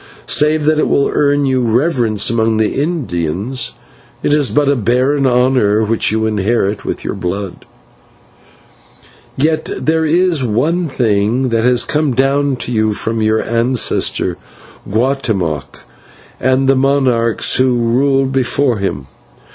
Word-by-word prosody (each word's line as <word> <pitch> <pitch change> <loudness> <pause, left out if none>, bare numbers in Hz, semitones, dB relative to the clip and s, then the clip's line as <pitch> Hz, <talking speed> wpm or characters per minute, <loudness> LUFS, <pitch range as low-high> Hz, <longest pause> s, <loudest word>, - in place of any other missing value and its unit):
Save 150 0 +1
that 155 0 +2
it - - +1
will 140 - +1
earn 145 -1 +1
you 130 -1 +1
reverence 120 -4 +1
among 110 -1 +1
the 110 -1 0
Indians, 120 - -3 0.5
it - - +1
is 150 -3 +2
but 145 -1 +1
a 140 - +3
barren 130 +4 +1
honour 125 -4 +2
which 110 0 0
you 110 0 0
inherit 105 -1 -1
with - - -5
your - - -2
blood. 95 0 -5 1.7
"Yet 155 +3 0
there 160 +1 0
is 165 -1 +1
one 150 +10 0
thing 120 0 0
that 115 -1 0
has 125 -1 +3
come 150 -4 -1
down 135 +1 +1
to 125 - -4
you 110 -2 +1
from 110 +2 -3
your 110 0 +1
ancestor, 115 +1 0 0.5
Guatemoc, 105 - -2 0.6
and 130 +1 +1
the 135 - +4
monarchs 130 -4 +1
who 130 -1 +2
ruled 135 +3 +1
before 130 -1 0
him. 70 -9 -3
125 Hz, 135 wpm, -15 LUFS, 110-140 Hz, 1.7 s, the